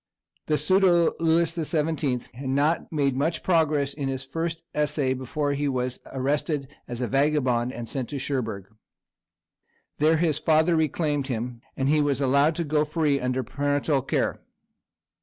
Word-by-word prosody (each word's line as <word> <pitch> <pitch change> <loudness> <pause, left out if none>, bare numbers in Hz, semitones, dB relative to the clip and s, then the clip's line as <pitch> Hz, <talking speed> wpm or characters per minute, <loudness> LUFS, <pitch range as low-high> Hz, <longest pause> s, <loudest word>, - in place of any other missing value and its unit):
The 150 - +2
pseudo 185 -2 +3
Louis 165 0 +2
the 165 - -2
Seventeenth 150 -5 -1
had 130 +2 -6
not 145 +5 +1
made 140 -4 +1
much 155 +4 -1
progress 155 -5 +2
in 140 -2 -3
his 135 0 -3
first 165 +4 -3
essay 150 -3 0
before 140 +3 -2
he 145 +1 -1
was 125 -2 -2
arrested 140 +1 -1 0.2
as 120 0 -5
a 125 - 0
vagabond, 130 -3 +1
and 120 -2 -6
sent 130 0 -4
to 145 - -4
Cherbourg. 115 -8 -3 1.3
There 155 +2 +4
his 155 -2 +1
father 160 +2 +3
reclaimed 150 -2 0
him, 120 -1 -4 0.2
and 135 - 0
he 150 +1 +3
was 140 -2 +1
allowed 140 +3 +3
to 170 - -1
go 150 -1 +1
free 150 -2 +1
under 125 0 -1
parental 145 +3 0
care. 135 - -1
145 Hz, 160 wpm, -25 LUFS, 130-155 Hz, 1.3 s, There